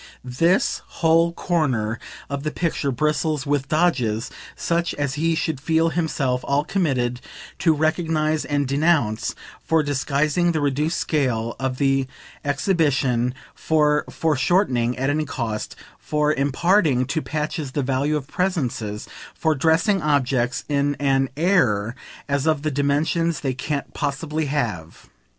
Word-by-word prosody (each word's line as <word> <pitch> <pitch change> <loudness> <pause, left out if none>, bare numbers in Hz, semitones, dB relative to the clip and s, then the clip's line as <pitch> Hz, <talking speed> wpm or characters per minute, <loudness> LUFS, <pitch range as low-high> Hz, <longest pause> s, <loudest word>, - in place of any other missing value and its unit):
This 165 +9 +1
whole 165 0 +3
corner 130 -12 -1 0.3
of 140 -1 -4
the 155 - -2
picture 155 -3 -1
bristles 150 +1 0
with 140 -1 0
"dodges" 130 -10 +1 0.2
such 170 0 -1
as 145 -2 -1
he 165 +3 +1
should 160 -4 -2
feel 160 +2 +2
himself 145 -7 -1
all 140 +1 +1
committed 130 -9 0 0.4
to 175 -4 +4
recognise 155 0 +1
and 145 -1 -1
denounce 140 -6 +1 0.3
for 160 -1 +2
disguising 145 +4 +1
the 160 - 0
reduced 150 +4 0
scale 120 -7 0
of 130 -1 -2
the 135 -1 +2 0.4
exhibition, 140 -5 +1 0.2
for 150 -1 +2
foreshortening 135 - +1
at 135 +2 +1
any 155 +1 0
cost, 115 -6 -4 0.2
for 150 0 +1
imparting 145 0 +2
to 155 +5 -1
patches 150 -3 -3
the 145 - 0
value 140 +3 0
of 140 - -6
presences, 130 - -2 0.3
for 160 -1 +1
dressing 165 +7 +2
objects 135 -4 +1
in 145 0 +1
an 135 -2 +1
AIR 120 - +2 0.3
as 140 +1 0
of 155 -2 +1
the 155 - 0
dimensions 150 +3 0
they 135 -2 -1
can't 140 +3 -4
possibly 150 +2 -2
have. 110 - -3
145 Hz, 130 wpm, -22 LUFS, 130-160 Hz, 0.4 s, to